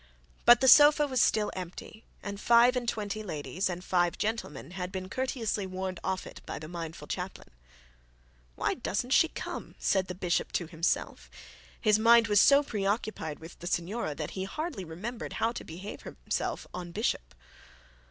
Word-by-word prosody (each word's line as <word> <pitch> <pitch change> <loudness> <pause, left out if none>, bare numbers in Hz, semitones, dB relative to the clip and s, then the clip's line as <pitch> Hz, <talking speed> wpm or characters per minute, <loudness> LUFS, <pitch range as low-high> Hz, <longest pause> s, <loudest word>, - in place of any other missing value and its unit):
But 240 +1 +8
the 265 - +4
sofa 295 +3 +8
was 260 -3 +1
still 210 -1 +2
empty, 185 +4 -8 0.2
and 200 0 -5
five 235 +2 +5
and 240 -2 0
twenty 215 -1 -3
ladies 185 +1 -3
and 180 0 -5
five 175 -2 +1
gentlemen 210 -9 -3
had 180 0 -5
been 185 -1 -6
courteously 235 -6 -2
warned 185 -1 -4
off 190 0 -2
it - - -11
by - - -4
the 155 - -8
mindful 165 -1 -7
chaplain. - - -6 1.0
'Why - - 0
doesn't 245 +6 -3
she 330 - +6
come?' - - -7
said 190 -2 +1
the 180 - -5
bishop 180 -1 -1
to 175 - 0
himself. 160 - -2 0.5
His 215 0 +3
mind 230 0 +6
was 205 -1 +6
so 280 +1 +6
preoccupied 205 - -2
with 165 +1 -12
the 175 - -7
signora, 175 -1 -2
that 150 -1 -5
he 190 0 -4
hardly 305 - -4
remembered 205 +9 -6
how 225 - 0
to 240 - -7
behave 185 +6 -8
himself - - -4
en 175 -1 -6
bishop. 170 - -2
195 Hz, 170 wpm, -29 LUFS, 175-235 Hz, 1.0 s, But